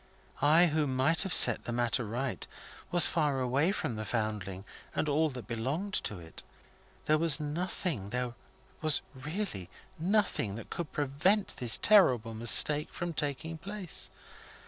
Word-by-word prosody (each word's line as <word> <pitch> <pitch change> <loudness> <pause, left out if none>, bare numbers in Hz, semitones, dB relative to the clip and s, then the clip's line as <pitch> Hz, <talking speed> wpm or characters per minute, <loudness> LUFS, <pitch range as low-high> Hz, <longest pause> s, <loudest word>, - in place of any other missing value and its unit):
I, 160 +4 +5
who 155 -2 0
might 135 +5 +1
have 190 - 0
set - - +6
the - - -4
matter 120 +1 -1
right, 120 +5 -4 0.4
was 175 -1 +4
far 150 -5 0
away 135 +7 +1
from 120 - -4
the 110 - -4
Foundling 105 -4 -4 0.3
and - - -1
all 155 +2 +1
that 125 -4 -9
belonged 135 - -4
to 105 - -5
it. 80 -2 -11 0.6
There 155 0 +2
was 160 -2 +6
nothing 150 - -4
there 125 +1 -3 0.5
was 155 -2 +1
really 140 - -6 0.3
nothing 180 - 0
that 115 - -10
could 170 -3 -5
prevent 150 +9 0
this 120 -3 +5
terrible 125 - +3
mistake 145 +7 +4
from 175 0 -5
taking 155 +2 -4
place. 195 -2 -5
145 Hz, 145 wpm, -30 LUFS, 120-165 Hz, 0.6 s, set